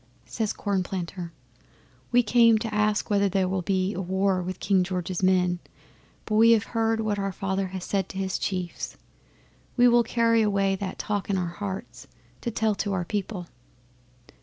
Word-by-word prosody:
'Says 220 -3 -2
Cornplanter, 185 -3 -3 0.8
"We 245 0 +5
came 230 0 +5
to 220 0 -4
ask 210 +1 +1
whether 200 -1 +3
there 190 0 +1
will 190 0 -1
be 190 +2 0
war 190 +1 0
with 185 +1 -5
King 190 -2 +2
George's 180 0 -3
men, 180 -1 +2 0.7
but 215 - -4
we 230 +1 +7
have 220 -3 +3
heard 225 -1 0
what 215 -2 -1
our 195 0 -1
Father 190 0 -2
has 185 -1 -6
said 195 -2 -1
to 190 - -8
his 190 -1 -2
chiefs. 180 -3 -4 0.8
We 245 0 +6
will 240 0 +5
carry 230 -1 +2
away 200 -2 +2
that 190 -1 -5
talk 205 -2 -3
in 195 - +1
our 180 - 0
hearts 170 -9 -6 0.3
to - - -2
tell 220 -1 +1
to 200 - -2
our 180 -2 -1
people." 200 -2 -3
195 Hz, 170 wpm, -26 LUFS, 185-215 Hz, 0.8 s, we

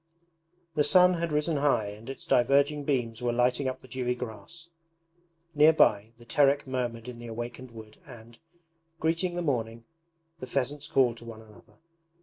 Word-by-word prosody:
The 150 -2 +2
sun 180 +3 +5
had 170 -1 -2
risen 150 +1 0
high 140 -7 +1
and 105 +4 -11
its 135 - -8
diverging 140 +4 +2
beams 120 -6 -1
were 120 -1 0
lighting 125 +3 +1
up 130 - -5
the - - -13
dewy 125 0 -2
grass. 125 +8 -9 0.9
Near 155 +1 +6
by, 110 -6 +3
the 120 - -16
Terek 140 +4 +2
murmured 125 -3 -4
in 125 -1 -8
the 120 - -9
awakened 120 +2 -7
wood 110 -2 -13
and, 115 -3 -14 0.6
greeting 165 +2 0
the 175 - -2
morning, 115 -5 -2 0.5
the 130 - -7
pheasants 140 +3 -2
called 125 -5 +2
to 115 - -13
one 110 -1 -10
another. 105 -2 -19
125 Hz, 165 wpm, -28 LUFS, 115-145 Hz, 0.9 s, Near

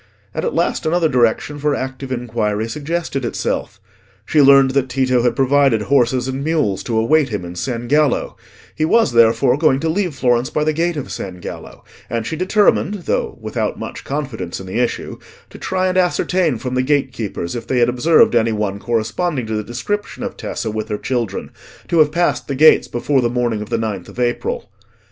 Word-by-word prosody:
And - - -3
at 475 - -2
last - - 0
another 170 0 +2
direction 125 +2 +1
for 145 0 +1
active 130 0 -5
inquiry 110 -3 -2
suggested 150 +2 -3
itself. 105 -3 -3 0.5
She 150 - +3
learned 135 -1 +6
that 135 -1 0
Tito 130 -1 +1
had 120 0 +1
provided 135 -4 +3
horses 125 0 +2
and 130 +1 -3
mules 150 -11 0
to 115 -2 -1
await 135 +6 +3
him 105 -5 -4
in 85 - -7
San 120 +5 -4
Gallo; 150 +2 +1 0.4
he 155 - -2
was 195 - +3
therefore 115 +3 +4
going 150 -4 +3
to 160 - 0
leave 175 -2 -1
Florence 125 -2 +1
by 150 - -1
the 155 0 +1
gate 170 +1 0
of 145 - -5
San 90 -2 -6
Gallo, - - -9 0.3
and 115 -1 -2
she 160 - -3
determined, 200 +1 +1
though - - -1
without - - -3
much - - -7
confidence 130 - -4
in 95 - -8
the 95 +5 -3
issue, 120 -1 -2 0.3
to - - -11
try 185 0 -1
and 185 0 +1
ascertain 180 -4 +1
from 125 +2 -5
the 130 - +2
gatekeepers 130 - -2
if 120 - -6
they 130 - 0
had 120 -1 +4
observed 125 +7 +4
any 115 -1 +3
one 105 -2 -2
corresponding 120 - -1
to 110 - -4
the 105 - -2
description 205 - -4
of 245 - -4
Tessa 110 - -4
with 110 0 -4
her 105 - -1
children, 120 -4 -3 0.4
to 170 - +2
have 150 -1 +5
passed 175 +2 0
the 140 - -2
gates 155 +4 +6
before 130 +3 0
the 120 - +1
morning 120 -3 -1
of 105 - -7
the 115 - 0
ninth 105 -5 -4
of - - -11
April. 460 - -1
130 Hz, 200 wpm, -19 LUFS, 115-155 Hz, 0.5 s, learned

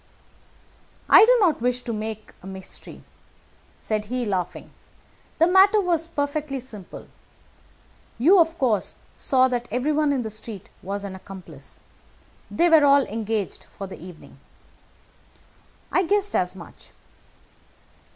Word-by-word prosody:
"I - - +10
do - - +6
not 330 - +2
wish 250 +1 0
to 235 - -4
make 215 0 -6
a 190 - -11
mystery," 190 -1 -9 0.7
said 215 -1 -2
he, 250 +2 -3
laughing. 185 -4 -3 0.7
"The 330 - +5
matter 385 +4 +5
was 340 -4 0
perfectly 285 -2 -3
simple. 215 -7 -10 1.1
You, 340 +11 +5
of 325 0 +2
course, 235 -6 0 0.2
saw 260 -1 +3
that 245 -1 -2
everyone 290 +5 +1
in 265 -3 0
the 220 - -5
street 215 -2 -9
was 200 +1 -4
an 200 -1 -6
accomplice. 190 0 -11 0.7
They 345 - +2
were 320 -3 +6
all 280 0 +6
engaged 220 -3 -4
for 200 - -9
the 190 - -10
evening." 180 -3 -13 1.5
"I - - +3
guessed 405 +2 +1
as 180 +1 0
much." 170 -4 -13
245 Hz, 130 wpm, -24 LUFS, 205-315 Hz, 1.5 s, I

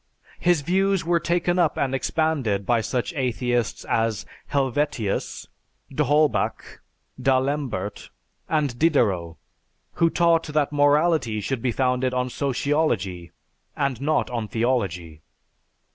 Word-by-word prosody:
His 175 -3 +2
views 190 +3 +1
were 170 0 +2
taken 175 +2 0
up 170 -4 +2
and 135 -1 0
expanded 135 -8 0
by 120 +1 +2
such 125 +7 -2
atheists 125 -3 -1
as 115 -2 0 0.2
Helvetius, 135 -6 -1 0.5
d'Holbach, 150 +2 0 0.4
d'Alembert, 130 -7 -1 0.4
and 145 -6 0
Diderot, 95 - +2 0.7
who 165 - +5
taught 165 -1 +2
that 150 -1 0
morality 145 -5 +2
should 120 +3 -3
be 125 - 0
founded 125 +1 0
on 125 0 -1
sociology 125 - -1 0.5
and 135 -4 -1
not 150 -2 0
on 115 -3 -3
theology. 95 -10 -2
135 Hz, 110 wpm, -24 LUFS, 115-155 Hz, 0.7 s, who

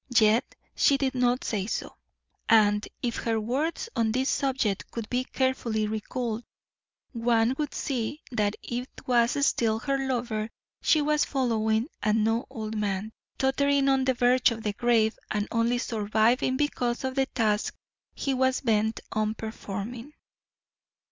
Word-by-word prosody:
Yet 220 +2 +4 0.2
she 280 - +4
did 270 -1 0
not 250 0 +1
say 200 -3 -2
so, - - -4 0.5
and 210 -2 +4 0.2
if 235 -2 -1
her 225 -1 0
words 275 - -1
on 225 -1 +2
this 260 +4 +1
subject 260 -8 0
could 230 -2 -5
be 250 +1 +1
carefully 245 -5 0
recalled, 220 +2 -3 0.7
one 230 0 +2
would 295 -2 -2
see 265 +2 -3
that 210 -3 0
it 245 +2 -4 0.2
was 245 +3 +3
still 220 -5 +2
her 275 +4 -1
lover 235 -4 -2 0.3
she 305 -2 +3
was 300 0 +2
following 225 -3 +1
and 215 +1 +2
no 225 +2 0
old 220 -4 -5
man, 210 0 -2 0.2
tottering 275 +1 +2
on 265 -1 +3
the 260 -1 +2
verge 250 +1 +4
of 225 -2 -5
the 210 - -1
grave 230 -1 +2
and 210 -1 -1
only 235 +1 +2
surviving 225 +3 +1
because 250 -4 -1
of 260 0 -1
the 270 0 +1
task 215 -5 0 0.4
he 275 - -1
was 260 0 +1
bent 220 -2 +1
on 215 0 0
performing. 225 +4 -6
235 Hz, 150 wpm, -27 LUFS, 220-260 Hz, 0.7 s, Yet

